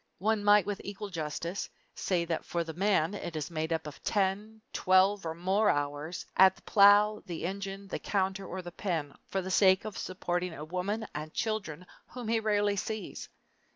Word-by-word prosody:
One 215 Hz, +1 st, +1 dB
might 205 Hz, -2 st, +6 dB
with 205 Hz, -1 st, -3 dB
equal 200 Hz, 0 st, -6 dB
justice 170 Hz, +3 st, -4 dB, 0.2 s
say 175 Hz, -3 st, 0 dB
that 165 Hz, -1 st, -2 dB
for 170 Hz, -1 st, -2 dB
the 160 Hz, -1 st, -7 dB
man 190 Hz, -1 st, +2 dB
it 175 Hz, -5 st, -5 dB
is 155 Hz, +2 st, -4 dB
made 160 Hz, 0 st, -2 dB
up 160 Hz, -1 st, -1 dB
of 150 Hz, -, -9 dB
ten, 205 Hz, +2 st, 0 dB
twelve, 185 Hz, 0 st, +3 dB
or 160 Hz, -, -3 dB
more 190 Hz, +5 st, +2 dB
hours, 145 Hz, +3 st, -2 dB
at 190 Hz, 0 st, +7 dB
the -, -, -21 dB
plow, 205 Hz, +1 st, +6 dB
the 170 Hz, -2 st, -4 dB
engine, 195 Hz, +1 st, -5 dB
the -, -, -4 dB
counter, 195 Hz, -1 st, -1 dB
or 185 Hz, +1 st, -5 dB
the 175 Hz, -, -7 dB
pen 165 Hz, -6 st, -3 dB
for 190 Hz, -1 st, -2 dB
the 190 Hz, -, -4 dB
sake 190 Hz, +1 st, +5 dB
of 215 Hz, -, -5 dB
supporting 180 Hz, -1 st, -2 dB
a 150 Hz, -, -7 dB
woman 190 Hz, +6 st, -2 dB
and 155 Hz, +1 st, -6 dB
children 210 Hz, -7 st, -2 dB, 0.2 s
whom 245 Hz, -3 st, -7 dB
he 230 Hz, 0 st, +3 dB
rarely 205 Hz, -2 st, +1 dB
sees! 215 Hz, +2 st, -4 dB
190 Hz, 190 wpm, -30 LUFS, 170-205 Hz, 0.2 s, at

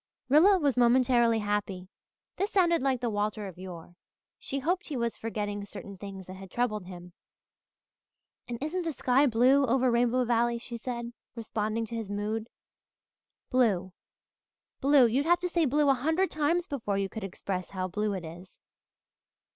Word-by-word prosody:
Rilla 355 Hz, +8 st, +6 dB
was 285 Hz, -7 st, +1 dB
momentarily 240 Hz, -1 st, +4 dB
happy. 205 Hz, -3 st, -2 dB, 0.5 s
This 395 Hz, +2 st, 0 dB
sounded 345 Hz, -5 st, +3 dB
like 260 Hz, -2 st, 0 dB
the 240 Hz, -, 0 dB
Walter 210 Hz, 0 st, -2 dB
of 180 Hz, -2 st, -11 dB
yore. 175 Hz, -2 st, -9 dB, 0.5 s
She 275 Hz, -, -4 dB
hoped 345 Hz, +7 st, -1 dB
he 290 Hz, -, -4 dB
was 235 Hz, -1 st, -1 dB
forgetting 205 Hz, -2 st, -4 dB
certain 200 Hz, 0 st, -9 dB
things 195 Hz, -1 st, -9 dB
that 185 Hz, +1 st, -9 dB
had 190 Hz, 0 st, -10 dB
troubled 215 Hz, -3 st, -1 dB
him. 180 Hz, -1 st, -10 dB, 1.3 s
"And 240 Hz, -1 st, -4 dB
isn't 345 Hz, +5 st, -2 dB
the 330 Hz, -2 st, -3 dB
sky 260 Hz, +2 st, +3 dB
blue 255 Hz, +4 st, +4 dB
over 255 Hz, 0 st, +2 dB
Rainbow 245 Hz, +1 st, +2 dB
Valley?" 235 Hz, 0 st, +1 dB
she 235 Hz, +1 st, -8 dB
said, 235 Hz, 0 st, -5 dB, 0.2 s
responding 220 Hz, 0 st, -2 dB
to 230 Hz, -, -7 dB
his 225 Hz, -3 st, -4 dB
mood. 215 Hz, +2 st, -3 dB, 1.0 s
"Blue 200 Hz, -8 st, +2 dB, 0.9 s
blue 275 Hz, -1 st, +5 dB
you'd 265 Hz, +6 st, +1 dB
have 345 Hz, 0 st, +4 dB
to 360 Hz, -, -1 dB
say 340 Hz, -2 st, +2 dB
'blue' 295 Hz, +2 st, +2 dB
a 275 Hz, -, +6 dB
hundred 320 Hz, +9 st, 0 dB
times 320 Hz, +3 st, +1 dB
before 225 Hz, -, -3 dB
you 195 Hz, 0 st, 0 dB
could 215 Hz, +2 st, -7 dB
express 185 Hz, -1 st, -4 dB
how 185 Hz, -1 st, -3 dB
blue 210 Hz, +3 st, -1 dB
it 180 Hz, -3 st, -5 dB
is." 175 Hz, +4 st, -11 dB
235 Hz, 165 wpm, -29 LUFS, 205-275 Hz, 1.3 s, Rilla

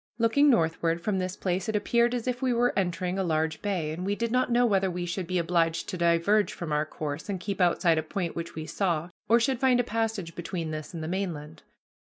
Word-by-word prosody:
Looking 240 Hz, +6 st, +4 dB
northward 165 Hz, -, +2 dB
from 190 Hz, +2 st, -1 dB
this 185 Hz, 0 st, -3 dB
place 185 Hz, +1 st, -1 dB
it 220 Hz, -, -1 dB
appeared 235 Hz, +3 st, +2 dB
as 240 Hz, -, -3 dB
if 250 Hz, -1 st, -2 dB
we 255 Hz, -2 st, +2 dB
were 245 Hz, +1 st, +2 dB
entering 180 Hz, 0 st, -1 dB
a -, -, +1 dB
large 160 Hz, -2 st, 0 dB
bay, 180 Hz, -7 st, -1 dB
and 165 Hz, +3 st, -5 dB
we 200 Hz, +2 st, 0 dB
did 235 Hz, +1 st, -2 dB
not 250 Hz, 0 st, +1 dB
know 245 Hz, +1 st, +4 dB
whether 195 Hz, -4 st, +2 dB
we 175 Hz, 0 st, -3 dB
should 175 Hz, 0 st, -3 dB
be 185 Hz, -, -1 dB
obliged 165 Hz, -1 st, +1 dB
to -, -, -3 dB
diverge 170 Hz, +5 st, +2 dB
from 170 Hz, -3 st, -6 dB
our 150 Hz, +1 st, +1 dB
course 155 Hz, +3 st, -5 dB
and 195 Hz, -2 st, -2 dB
keep 200 Hz, +1 st, -3 dB
outside 170 Hz, -2 st, +3 dB
a -, -, 0 dB
point 170 Hz, +2 st, -4 dB
which 170 Hz, 0 st, -5 dB
we 155 Hz, 0 st, -5 dB
saw, 170 Hz, -2 st, -1 dB, 0.2 s
or 230 Hz, +1 st, +6 dB
should 240 Hz, +1 st, +1 dB
find 260 Hz, -2 st, +4 dB
a -, -, +3 dB
passage 220 Hz, -7 st, -2 dB
between 165 Hz, -1 st, -4 dB
this 155 Hz, -1 st, -6 dB
and 160 Hz, -, -4 dB
the -, -, -4 dB
mainland. 165 Hz, -5 st, -4 dB
185 Hz, 235 wpm, -27 LUFS, 165-220 Hz, 0.2 s, or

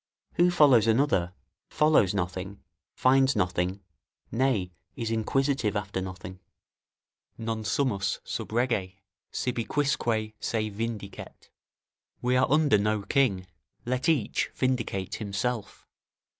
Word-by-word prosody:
Who 175 Hz, +1 st, +4 dB
follows 140 Hz, -, +5 dB
another, 110 Hz, -7 st, +2 dB, 0.3 s
follows 150 Hz, -11 st, +3 dB
nothing, 95 Hz, +1 st, -4 dB, 0.3 s
finds 135 Hz, +1 st, +4 dB
nothing, 90 Hz, +2 st, 0 dB, 0.5 s
nay, 115 Hz, -8 st, +1 dB, 0.2 s
is 115 Hz, -4 st, -3 dB
inquisitive 115 Hz, 0 st, 0 dB
after 100 Hz, -2 st, -2 dB
nothing. 95 Hz, 0 st, -7 dB, 1.0 s
"Non 115 Hz, -1 st, -3 dB
sumus 105 Hz, -5 st, 0 dB
sub -, -, -5 dB
rege; 110 Hz, -6 st, 0 dB, 0.4 s
sibi 120 Hz, -2 st, -2 dB
quisque 115 Hz, -6 st, 0 dB
se 110 Hz, -1 st, -1 dB
vindicet." 105 Hz, -1 st, -6 dB, 0.7 s
["We 125 Hz, +1 st, +1 dB
are 130 Hz, -, +4 dB
under 145 Hz, -6 st, +4 dB
no 105 Hz, 0 st, 0 dB
king; 105 Hz, -8 st, +1 dB, 0.4 s
let 130 Hz, +6 st, 0 dB
each 145 Hz, -10 st, +1 dB
vindicate 110 Hz, -7 st, -1 dB
himself." 105 Hz, +1 st, -3 dB
110 Hz, 105 wpm, -27 LUFS, 100-130 Hz, 1.0 s, follows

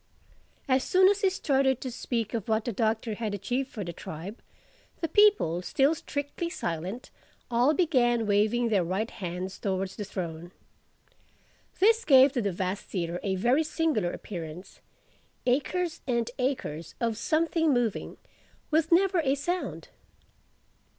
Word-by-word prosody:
As 260 Hz, -1 st, +3 dB
soon 375 Hz, +1 st, +5 dB
as 410 Hz, 0 st, +1 dB
he 390 Hz, -, +4 dB
started 270 Hz, -7 st, +1 dB
to 260 Hz, -, -4 dB
speak 230 Hz, -2 st, -3 dB
of 225 Hz, -2 st, -3 dB
what 220 Hz, 0 st, +1 dB
the 240 Hz, -, -1 dB
Doctor 220 Hz, +1 st, 0 dB
had 210 Hz, -1 st, -3 dB
achieved 255 Hz, +7 st, -2 dB
for 215 Hz, -6 st, -5 dB
the 170 Hz, -1 st, -6 dB
tribe, 170 Hz, +8 st, -8 dB, 0.6 s
the 330 Hz, -, -1 dB
people, 405 Hz, -, +4 dB
still 275 Hz, -, +2 dB
strictly 290 Hz, +2 st, -4 dB
silent, 180 Hz, -, -4 dB, 0.4 s
all 245 Hz, +6 st, +3 dB
began 245 Hz, -9 st, +2 dB
waving 215 Hz, +4 st, +2 dB
their 200 Hz, -5 st, +2 dB
right 190 Hz, +6 st, -2 dB
hands 185 Hz, +1 st, -5 dB
towards 190 Hz, -1 st, -2 dB
the 210 Hz, -, -4 dB
throne. 170 Hz, -3 st, -5 dB, 1.3 s
This 450 Hz, +4 st, +4 dB
gave 270 Hz, -, +7 dB
to 255 Hz, -3 st, -1 dB
the 200 Hz, -2 st, 0 dB
vast 185 Hz, +2 st, -3 dB
theatre 175 Hz, -2 st, -3 dB
a 195 Hz, -2 st, -1 dB
very 245 Hz, +10 st, +2 dB
singular 305 Hz, -, 0 dB
appearance: 170 Hz, -1 st, -8 dB, 0.7 s
acres 315 Hz, +7 st, 0 dB
and 235 Hz, -2 st, 0 dB
acres 210 Hz, -, -3 dB
of 230 Hz, -2 st, 0 dB
something 325 Hz, +2 st, +1 dB
moving—with 275 Hz, -, -2 dB
never 370 Hz, +1 st, +4 dB
a 270 Hz, -1 st, +2 dB
sound. 350 Hz, +6 st, -3 dB
240 Hz, 140 wpm, -28 LUFS, 195-300 Hz, 1.3 s, gave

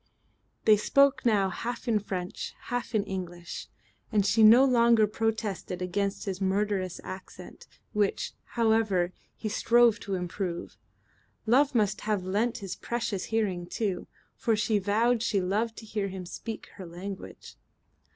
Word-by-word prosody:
They 215 Hz, -1 st, +7 dB
spoke 275 Hz, +4 st, +3 dB
now 200 Hz, -4 st, +3 dB
half 240 Hz, +5 st, -5 dB
in 220 Hz, -3 st, +3 dB
French, 185 Hz, -3 st, -5 dB, 0.2 s
half 245 Hz, -1 st, -2 dB
in 210 Hz, -, +3 dB
English, 175 Hz, -3 st, -6 dB, 0.4 s
and 205 Hz, -3 st, +2 dB
she 210 Hz, +3 st, +3 dB
no 230 Hz, +5 st, +8 dB
longer 235 Hz, -3 st, +5 dB
protested 215 Hz, -4 st, -2 dB
against 195 Hz, +2 st, -2 dB
his 195 Hz, -1 st, -4 dB
murderous 190 Hz, -1 st, 0 dB
accent, 185 Hz, 0 st, -10 dB, 0.3 s
which, 210 Hz, -2 st, 0 dB, 0.2 s
however, 220 Hz, -6 st, +2 dB, 0.2 s
he 220 Hz, -, -5 dB
strove 230 Hz, +1 st, +4 dB
to 195 Hz, -1 st, -3 dB
improve. 180 Hz, 0 st, -4 dB, 0.7 s
Love 265 Hz, +4 st, +3 dB
must 210 Hz, -3 st, +2 dB
have 210 Hz, -3 st, -1 dB
lent 210 Hz, +4 st, -1 dB
its 195 Hz, -, -4 dB
precious 230 Hz, -5 st, -3 dB
hearing 195 Hz, -6 st, -1 dB
too, 195 Hz, -2 st, -2 dB, 0.3 s
for 225 Hz, -, +1 dB
she 210 Hz, 0 st, +1 dB
vowed 220 Hz, +4 st, +2 dB
she 220 Hz, -3 st, +1 dB
loved 210 Hz, +5 st, -1 dB
to 225 Hz, -, -9 dB
hear 210 Hz, -2 st, -2 dB
him 190 Hz, -1 st, -6 dB
speak 220 Hz, +5 st, -7 dB
her 190 Hz, -, -7 dB
language. 185 Hz, +3 st, -8 dB
210 Hz, 140 wpm, -28 LUFS, 190-225 Hz, 0.7 s, no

